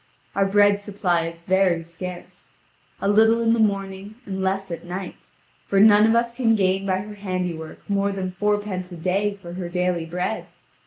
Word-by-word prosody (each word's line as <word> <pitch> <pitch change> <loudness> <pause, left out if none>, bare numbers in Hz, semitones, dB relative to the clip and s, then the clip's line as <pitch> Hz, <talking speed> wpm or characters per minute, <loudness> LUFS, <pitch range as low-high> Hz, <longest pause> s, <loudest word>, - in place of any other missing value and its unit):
Our 195 0 +2
bread 205 0 +4
supply 185 -5 -1
is 165 0 -9
very 185 -2 +2
scarce 175 +2 -9 0.5
a - - -1
little 220 +3 +5
in 230 0 +3
the 230 - +1
morning 200 -1 -1
and 190 -1 -4
less 195 0 -1
at 170 - -5
night, 180 +2 -7 0.4
for 195 - +2
none 210 +1 +7
of 225 - +3
us 235 0 +1
can 235 -2 +2
gain 195 -1 +1
by 190 0 +1
her 210 +1 -8
handiwork 180 -5 -5
more 200 0 +1
than 190 -2 -3
fourpence 205 -1 -2
a 175 - -7
day 195 +4 0
for 170 0 -8
her 180 -1 -5
daily 180 -2 -1
bread. 180 +5 -3
195 Hz, 180 wpm, -23 LUFS, 180-205 Hz, 0.5 s, none